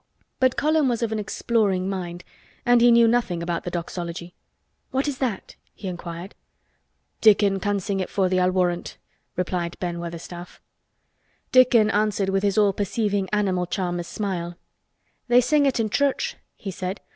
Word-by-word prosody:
But 260 -1 +2
Colin 310 -1 +2
was 235 -1 -1
of 225 - -1
an 220 - -1
exploring 205 -3 0
mind 175 -2 -4 0.4
and 245 -1 +5
he 240 - +7
knew 235 -1 +6
nothing 225 -8 +1
about 170 -1 -3
the - - -2
Doxology. 170 0 -5 0.6
"What 270 +2 -1
is 280 -3 -3
that?" 235 -8 -3 0.2
he 200 - -7
inquired. 175 +1 -6 0.9
"Dickon 205 -2 +5
can 205 +1 0
sing 195 +1 -2
it 185 - -2
for 195 -2 +1
thee, 185 0 +1
I'll 180 0 +3
warrant," 180 -1 -1 0.4
replied 175 -1 -2
Ben 175 -1 -3
Weatherstaff. 170 +1 -8 0.9
Dickon 245 -4 +5
answered 205 -2 +1
with 195 0 +1
his 200 0 0
all 205 -2 +4
perceiving 205 -1 -1
animal 190 -4 0
charmer's 175 -2 -2
smile. 175 -4 -3 0.7
"They 245 0 +6
sing 285 +3 +3
it 265 - 0
i' 225 - +1
church," 285 - 0 0.2
he 195 - -6
said. 185 +1 -4
195 Hz, 160 wpm, -24 LUFS, 180-230 Hz, 0.9 s, he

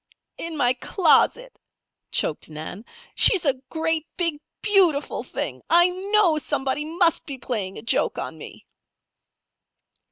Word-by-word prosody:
"In 330 -1 -5
my 245 -2 +3
closet," 385 - +1 0.5
choked - - -1
Nan. 160 +7 -8 0.3
"She's 380 -5 +5
a 275 - +3 0.2
great, 320 -1 -1
big, 335 -5 -1 0.2
beautiful 365 -9 +2
thing! - - -5
I 345 +1 +6
know 380 -3 +2
somebody 270 0 -2
must 335 +1 +1
be 275 -2 -6
playing 210 -7 -4
a - - -9
joke 230 - +1
on - - -5
me." - - -12
320 Hz, 125 wpm, -23 LUFS, 265-355 Hz, 0.5 s, I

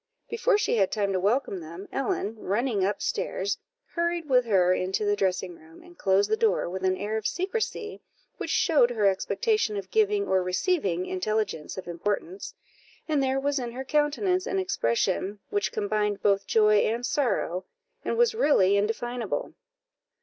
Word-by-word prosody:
Before 460 -1 +2
she 415 - +1
had 195 -3 +2
time 200 -2 0
to 185 - +1
welcome 205 0 0
them, 170 +4 -9
Ellen, 230 -5 -2
running 210 0 0
up 200 +1 -1
stairs, 200 +2 -2 0.3
hurried 340 -1 -1
with 250 -3 +4
her 185 -5 +4
into 185 +3 -1
the 205 0 +2
dressing 185 -2 -1
room, 160 - -17
and 350 0 -16
closed 195 - +2
the - - +2
door 445 0 +1
with 185 +2 -5
an 185 0 +2
air 210 +3 -2
of 220 - -1
secrecy 425 +3 -3 0.4
which - - -5
showed 290 -7 +4
her 220 -4 0
expectation 215 - +1
of 195 - -6
giving 420 -2 +2
or 190 -1 +2
receiving 185 - 0
intelligence 195 -4 -2
of 190 - -7
importance, 205 - -3 0.5
and 300 -3 +1
there 265 0 +1
was 285 0 0
in 240 -2 -5
her 265 +2 -5
countenance 305 +7 +1
an 385 - -1
expression 195 - 0
which 205 -1 0
combined 210 -1 -1
both 200 -1 +2
joy 210 -1 +4
and 230 +4 +1
sorrow, 205 - 0 0.4
and - - -2
was 475 -1 +4
really 200 - +4
indefinable. 225 +2 -2
215 Hz, 165 wpm, -27 LUFS, 190-300 Hz, 0.5 s, with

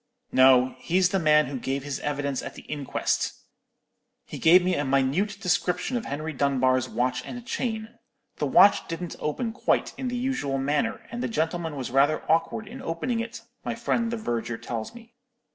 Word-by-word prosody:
"'No; 130 0 +6
he's 180 +1 +2
the 195 - +1
man 150 -2 +5
who 130 0 -5
gave 135 +2 -2
his 145 -1 -4
evidence 140 -2 -2
at - - -7
the - - -11
inquest. 145 -3 -1 0.9
He - - -8
gave 175 +3 +6
me 185 0 +1
a 145 - 0
minute 140 +10 +1
description 180 +4 0
of 235 - -2
Henry 155 +3 -4
Dunbar's 130 -2 +2
watch 125 +1 -1
and 245 -1 -8
chain. 230 -2 -4 0.4
The - - 0
watch 200 - +6
didn't 165 +1 -5
open 225 +10 -2
quite 255 - 0
in 260 - -2
the 245 0 -2
usual 245 - -1
manner, 150 +12 0
and 240 +1 -4
the - - 0
gentleman 165 -4 -2
was 130 -3 -5
rather 140 +4 +3
awkward 165 +7 +1
in 255 +5 -9
opening 230 +9 -2
it, 230 0 -5 0.2
my 240 - -3
friend 230 0 0
the 235 - -2
verger 120 - -3
tells 115 - -5
me. 235 0 -14
160 Hz, 180 wpm, -26 LUFS, 135-225 Hz, 0.9 s, No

